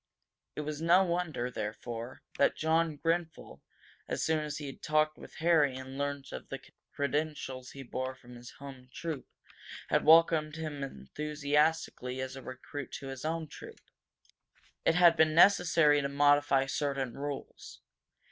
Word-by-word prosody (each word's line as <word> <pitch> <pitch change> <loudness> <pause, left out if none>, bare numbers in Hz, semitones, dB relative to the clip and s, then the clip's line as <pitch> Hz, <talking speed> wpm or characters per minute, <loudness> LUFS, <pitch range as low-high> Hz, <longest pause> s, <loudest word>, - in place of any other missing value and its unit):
It - - -3
was 150 0 -5
no 175 +3 +5
wonder, 170 -9 -2
therefore, 115 +3 -6 0.2
that 140 - +4
John 160 -1 +1
Grenfel, 165 +1 -2 0.5
as - - -2
soon 160 -1 +2
as 150 -1 -4
he 150 - -6
had 135 - -8
talked 155 0 +2
with - - -13
Harry 160 -5 +3
and 130 0 -8
learned 140 0 -3
of - - -8
the - - -5 0.3
credentials 140 -3 -2
he 135 - -8
bore 130 +1 -4
from 125 -1 -15
his 120 0 -11
home 135 -2 -11
troop, 160 0 -5 0.6
had - - +2
welcomed 160 -1 +5
him 155 -3 -5
enthusiastically 145 - -1
as 130 0 -4
a 135 - -8
recruit 130 +2 -7
to 135 - -6
his 135 -1 -7
own 160 0 -2
troop. - - -11 1.1
It 165 - +4
had 175 -2 +7
been 155 -1 +3
necessary 165 -5 +5
to 140 - -2
modify 145 -1 +4
certain 135 -2 -2
rules. 140 +1 -7
145 Hz, 150 wpm, -31 LUFS, 135-160 Hz, 1.1 s, had